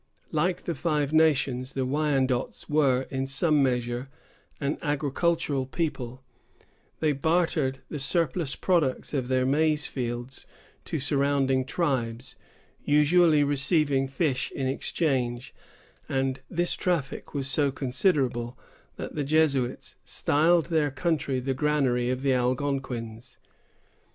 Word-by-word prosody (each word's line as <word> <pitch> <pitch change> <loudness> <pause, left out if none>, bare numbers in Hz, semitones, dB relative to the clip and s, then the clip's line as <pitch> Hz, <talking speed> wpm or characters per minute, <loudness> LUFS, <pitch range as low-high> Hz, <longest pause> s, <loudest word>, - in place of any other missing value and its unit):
Like 175 +3 0
the 170 - -2
Five 150 -3 -1
Nations, 135 -5 +2
the 135 -1 -1
Wyandots 135 -3 0
were 140 -4 +2
in 135 0 -2
some 145 +2 +2
measure 125 0 -1 0.5
an 140 0 -2
agricultural 145 -1 0
people; 135 -5 -3 0.8
they 155 -1 +2
bartered 155 -2 0
the 150 - -5
surplus 145 +1 0
products 165 -9 0
of 130 -4 -1
their 130 0 +1
maize 150 +2 +2
fields 120 0 -5 0.4
to - - -3
surrounding 140 -2 +1
tribes, 125 -5 -2 0.5
usually 150 +1 +4
receiving 140 -1 +2
fish 135 -1 -1
in 135 - -2
exchange; 130 -3 -1 0.6
and 135 0 0
this 175 0 0
traffic 165 -5 -2
was 135 -2 -2
so 140 +1 +1
considerable, 130 -3 0 0.4
that - - -6
the 150 - -2
Jesuits 140 -4 0
styled 165 +3 +2
their 155 -3 +2
country 140 -1 -1
the 135 +1 -1
Granary 130 -4 +1
of 130 +1 -2
the 135 -1 +3
Algonquins. 125 -3 -2
140 Hz, 115 wpm, -27 LUFS, 130-155 Hz, 0.8 s, usually